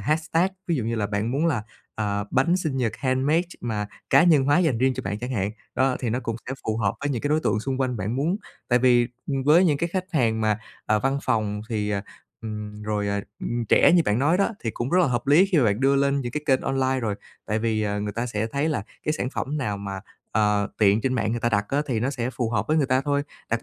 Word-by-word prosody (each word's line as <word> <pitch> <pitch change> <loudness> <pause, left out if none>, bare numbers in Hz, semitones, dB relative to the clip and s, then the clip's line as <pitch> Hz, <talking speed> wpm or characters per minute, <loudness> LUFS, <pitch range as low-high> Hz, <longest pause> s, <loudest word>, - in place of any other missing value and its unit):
hashtag, 160 +4 +1 0.2
ví 170 -3 +1
dụ 120 - -2
như 115 - -1
là 105 -3 0
bạn 105 +3 -2
muốn 155 +5 +1
là, 130 -10 0 0.3
ờ, 100 -1 -1
bánh 165 +7 +3
sinh 155 -7 -2
nhật 120 -4 0
handmade 135 +5 +2 0.2
mà 105 -3 -2 0.2
cá 140 - +7
nhân 155 -6 +5
hóa 145 +5 +4
dành 155 -10 +2
riêng 130 +1 +2
cho - - -4
bạn 105 +2 -3
chẳng 125 +3 -5
hạn, 100 -4 -1 0.2
đó, 130 -1 +2
thì 120 -4 -2
nó 125 +3 -1
cũng 115 -2 -3
sẽ 130 - -3
phù 110 0 0
hợp 100 -3 0
với 145 - -1
những 125 -2 -2
cái 145 - 0
đối 155 +1 +2
tượng 105 - 0
xung 135 +2 -3
quanh 125 -2 0
bạn 105 +5 -2
muốn. 165 +8 +1 0.3
Tại 120 0 +4
vì, 120 -1 +4 0.2
ừm, 135 -2 -1
với 160 +6 +5
những 150 -5 +2
cái 170 - 0
khách 185 +1 -2
hàng 115 -6 +2
mà, 110 -1 +1 0.3
ờ, 105 0 +3
văn 135 +3 0
phòng 105 -1 0
thì 105 -3 -1
ờ, 100 -1 0 0.4
ừm, 105 -1 -6
rồi, 105 -1 -1
ờ, 100 0 0 0.2
ừm, 120 0 -2
trẻ - - +6
như 175 - +5
bạn 105 +3 +1
nói 160 +6 +3
đó 200 - +3
thì 115 - -2
cũng 120 +4 -4
rất 180 - +4
là 175 - +4
hợp 120 -1 -1
lý 155 +8 +6
khi 165 - +5
mà 130 - +4
bạn 105 +2 +1
đưa 135 +1 +4
lên 140 0 +2
những 120 -2 -4
cái 150 - -3
kênh 130 -2 +3
online 130 -1 0
rồi, 110 -4 -1 0.3
tại 110 +1 0
vì, 110 -1 0
ờ, 105 0 -1
người 105 0 -3
ta 115 +3 -2
sẽ 110 -2 -2
thấy 140 +6 -1
là 145 -10 -1 0.2
cái 155 - 0
sản 130 -4 -2
phẩm 150 +1 -3
nào 105 -7 -2
mà, 100 -1 -5 0.3
ờ, 105 -1 +2
tiện 105 0 +4
trên 130 +2 0
mạng 110 -3 0
người 120 - -2
ta 120 - +1
đặt 105 -2 +1
á 145 +2 +1
thì 120 -5 -1
nó 130 +4 0
sẽ 125 -2 -3
phù 120 -3 -2
hợp 110 -3 0
với 155 - +3
người 145 -4 +3
ta 130 0 +2
thôi. 145 +1 0 0.3
Đặc 115 0 0
125 Hz, 275 wpm, -24 LUFS, 110-140 Hz, 0.4 s, cá